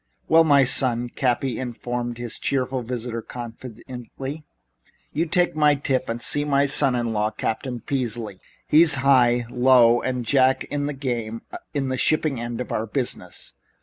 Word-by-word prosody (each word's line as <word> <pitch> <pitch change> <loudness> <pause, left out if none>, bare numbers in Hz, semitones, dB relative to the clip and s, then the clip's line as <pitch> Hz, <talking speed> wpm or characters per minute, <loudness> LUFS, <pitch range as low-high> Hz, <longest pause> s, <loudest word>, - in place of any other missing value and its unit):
"Well, 165 +1 +6
now, 140 -3 +5
son," 125 -2 +2
Cappy 125 -1 -1
informed 120 -1 -4
his 120 -1 -6
cheerful 130 -1 -1
visitor 120 -1 -4
confidentially, 125 +4 -8 0.7
"you 165 +3 0
take 175 0 +1
my 150 -1 +4
tip 135 -2 -1
and 115 +1 -3
see 145 +4 +2
my 140 -1 +2
son 135 -2 +4
in 120 -2 -1
law, 105 0 0
Captain 115 +3 -4
Peasley. 115 -6 -3 0.3
He's 155 0 +6
high, 120 -3 +4
low 120 -2 +5
and 125 -2 -3
jack 130 +1 +3
in 145 0 -1
the 145 - -3
game 120 -5 -4 0.3
in 135 -2 -1
the 130 - -2
shipping 155 -2 +1
end 120 0 -5
of 125 - -5
our 110 +1 -2
business." 125 +3 -4
125 Hz, 155 wpm, -23 LUFS, 120-140 Hz, 0.7 s, Well